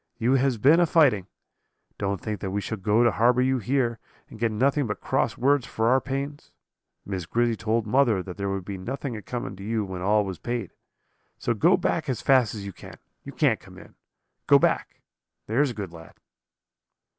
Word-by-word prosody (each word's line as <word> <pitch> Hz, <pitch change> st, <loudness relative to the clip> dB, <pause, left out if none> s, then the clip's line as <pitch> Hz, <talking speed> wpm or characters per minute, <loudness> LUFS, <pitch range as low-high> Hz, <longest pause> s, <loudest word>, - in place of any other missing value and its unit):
You 120 Hz, +2 st, +2 dB
has 135 Hz, -2 st, +2 dB
been 145 Hz, +10 st, +5 dB
a 175 Hz, -, +4 dB
fighting. 130 Hz, -, +3 dB, 0.7 s
Don't 100 Hz, -1 st, -1 dB
think 105 Hz, -2 st, -4 dB
that 95 Hz, -, -4 dB
we 100 Hz, +2 st, -1 dB
shall 105 Hz, +2 st, -5 dB
go 105 Hz, +5 st, +3 dB
to 120 Hz, -, +4 dB
harbour 125 Hz, +3 st, +3 dB
you 130 Hz, 0 st, +1 dB
here, 120 Hz, 0 st, 0 dB, 0.3 s
and 110 Hz, -, -11 dB
get 115 Hz, 0 st, +1 dB
nothing 135 Hz, +5 st, +1 dB
but 105 Hz, -, -4 dB
cross -, -, -1 dB
words 140 Hz, 0 st, +2 dB
for 110 Hz, +1 st, 0 dB
our 130 Hz, +1 st, +4 dB
pains. 140 Hz, +2 st, -5 dB, 0.5 s
Miss 95 Hz, -4 st, -4 dB
Grizzy 120 Hz, +4 st, +1 dB
told 110 Hz, +3 st, -1 dB
mother 115 Hz, -4 st, +2 dB
that 90 Hz, -2 st, -8 dB
there 100 Hz, 0 st, -3 dB
would 95 Hz, -2 st, -3 dB
be 100 Hz, -1 st, -6 dB
nothing 130 Hz, +5 st, -4 dB
a 105 Hz, -, -6 dB
coming 120 Hz, -2 st, -5 dB
to 95 Hz, -, -9 dB
you 110 Hz, 0 st, -1 dB
when 95 Hz, -2 st, -6 dB
all 105 Hz, +2 st, +2 dB
was 95 Hz, -3 st, -6 dB
paid. 120 Hz, -5 st, -4 dB, 0.7 s
So 120 Hz, -, -1 dB
go 170 Hz, -, +4 dB
back 160 Hz, -4 st, -1 dB
as 125 Hz, -, -1 dB
fast 130 Hz, -5 st, +3 dB
as 100 Hz, -2 st, -6 dB
you 100 Hz, -, -7 dB
can; -, -, -12 dB, 0.3 s
you -, -, -8 dB
can't -, -, +2 dB
come -, -, -15 dB
in. -, -, -14 dB, 0.5 s
Go -, -, +7 dB
back, -, -, 0 dB, 0.4 s
there's 130 Hz, +6 st, +1 dB
a -, -, -5 dB
good 95 Hz, -5 st, -6 dB
lad.' 80 Hz, -1 st, -13 dB
115 Hz, 205 wpm, -25 LUFS, 100-130 Hz, 0.7 s, Go